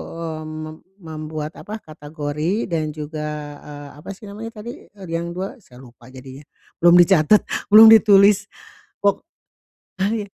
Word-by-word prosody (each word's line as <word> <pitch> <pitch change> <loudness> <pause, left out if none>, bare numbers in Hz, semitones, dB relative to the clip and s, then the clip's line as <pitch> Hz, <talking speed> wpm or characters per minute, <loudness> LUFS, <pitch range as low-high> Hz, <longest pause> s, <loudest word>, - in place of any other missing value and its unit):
eee, 160 -1 -6
mem 155 0 -8 0.3
membuat, 155 -1 -6
apa, 210 - -8
kategori 155 +5 -4
dan 155 -2 -2
juga, 150 -1 -6
eee, 145 -1 -11
apa - - -12
sih 205 - -22
namanya 220 +3 -9
tadi, 240 +2 -10
eee, 195 -3 -14
yang 170 +1 -4
dua? 190 +5 -6
Saya 130 - -17
lupa 120 -1 -17
jadinya. 130 +2 -12 0.4
Belum 175 +1 +6
dicatat, 175 +1 +5 0.2
belum 220 +2 +9
ditulis. 205 -2 +5 0.5
Wok 200 0 0 0.8
ah, 195 - +1
ya. 210 - -4
160 Hz, 145 wpm, -20 LUFS, 150-200 Hz, 0.8 s, belum